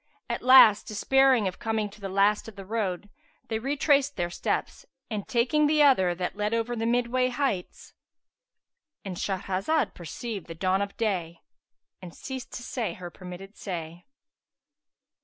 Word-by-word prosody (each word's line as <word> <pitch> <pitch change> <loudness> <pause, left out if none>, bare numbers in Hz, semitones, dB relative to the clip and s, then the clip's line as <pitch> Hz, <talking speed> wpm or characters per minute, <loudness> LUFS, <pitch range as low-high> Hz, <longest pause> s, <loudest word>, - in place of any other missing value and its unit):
[FN#378] - - 0
At - - -8
last, 255 -5 +7
despairing 260 +1 +3
of 185 - -5
coming 220 -2 -1
to 205 +1 -15
the 195 - -4
last 200 +3 +2
of 225 - -10
the 195 -1 -9
road, 205 -3 -2 0.4
they 220 -1 -1
retraced 285 +2 +1
their 175 0 -2
steps - - -3 0.3
and, 210 -2 -4
taking 260 +6 +2
the 300 0 +4
other, 190 -11 +4
that 180 +2 -3
led 210 +2 -1
over 230 +1 -1
the 225 0 -2
midway 245 +1 +1
heights,—And 265 - -7
Shahrazad 195 - -1
perceived 190 +5 -6
the 165 - -8
dawn 185 +3 +1
of 200 0 -4
day 180 -7 -2 0.6
and 175 -3 -10
ceased 260 -2 -7
to 245 - -6
say 240 -2 -3
her 175 -1 -8
permitted 185 +3 -10
say. 170 -2 -7
210 Hz, 155 wpm, -27 LUFS, 185-250 Hz, 0.6 s, last